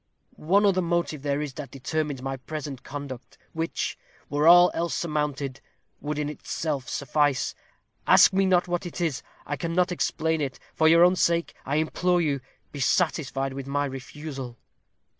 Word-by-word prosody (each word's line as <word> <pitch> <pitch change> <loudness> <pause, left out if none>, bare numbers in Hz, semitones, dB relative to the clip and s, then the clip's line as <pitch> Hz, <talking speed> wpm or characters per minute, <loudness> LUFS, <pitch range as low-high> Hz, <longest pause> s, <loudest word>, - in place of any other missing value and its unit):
One 195 +7 +2
other 190 -2 +3
motive 170 -4 -1
there 145 +1 -1
is 145 -3 -6
that 140 -1 -7
determines 140 0 -3
my 135 0 -2
present 140 -1 -6
conduct, 140 -3 -8 0.2
which, 165 0 -3 0.3
were 145 +2 +2
all 175 +1 +8
else 170 0 -1
surmounted, 150 -4 -2 0.4
would 150 0 -4
in 150 -1 -1
itself 150 -2 -4
suffice. 145 0 +1 0.5
Ask - - +7
me 195 0 +3
not 180 -1 +3
what 175 0 -1
that 175 - -7
is. 160 -6 -1 0.2
I 145 - -3
cannot 170 +5 0
explain 160 -2 0
it. 135 -2 -3 0.2
For 160 - +3
your 165 +2 +7
own 180 +1 +5
sake; 170 -1 +1
I 140 - 0
implore 175 +3 +1
you, 145 -5 0 0.3
be 145 - -7
satisfied 135 -3 0
with 135 0 -6
my 145 +1 0
refusal." 135 -2 -7
150 Hz, 160 wpm, -26 LUFS, 140-170 Hz, 0.5 s, all